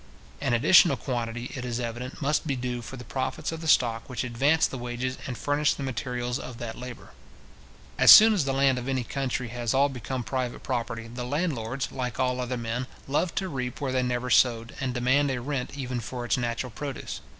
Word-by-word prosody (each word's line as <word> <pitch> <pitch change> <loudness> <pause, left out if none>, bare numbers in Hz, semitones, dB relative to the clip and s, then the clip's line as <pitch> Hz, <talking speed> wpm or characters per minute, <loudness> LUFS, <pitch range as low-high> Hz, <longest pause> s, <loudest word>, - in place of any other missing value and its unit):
An 135 -4 +2
additional 150 +3 +6
quantity, 120 0 -3
it 130 - -5
is 120 -1 -3
evident, 125 +4 -5
must 150 +3 +1
be 140 - 0
due 125 -1 -3
for 130 +3 -8
the 125 - -8
profits 130 +5 -3
of 165 0 -6
the 160 - -5
stock 115 -6 +3
which 125 -1 -2
advanced 140 +6 +2
the 135 - -4
wages 125 +1 -3
and 125 -3 -4
furnished 145 +1 +1
the 140 - -4
materials 125 -1 -3
of 125 - -8
that 115 -2 -5
labour. 125 -1 -9 0.9
As - - +9
soon 220 +1 +10
as 180 -9 +1
the 135 - 0
land 135 -1 +3
of 125 - -7
any 130 -2 0
country 130 -1 -3
has 120 0 -2
all 140 +1 +4
become 130 0 -4
private 125 -1 -3
property, 115 -3 -3
the 120 +2 -6
landlords, 135 -3 -2
like 125 -2 -4
all 125 0 +1
other 125 0 -2
men, 120 +2 -3 0.2
love 155 +5 0
to 190 - -1
reap 125 -6 -4
where 140 -2 -2
they 130 0 +1
never 125 0 -1
sowed, 115 -1 +3
and 135 -2 -1
demand 130 +4 +3
a 130 -2 -1
rent 135 +1 -4
even 125 -2 -3
for 120 +1 -5
its 110 - +2
natural 120 +1 -2
produce. 140 +3 -5
125 Hz, 210 wpm, -27 LUFS, 120-135 Hz, 0.9 s, soon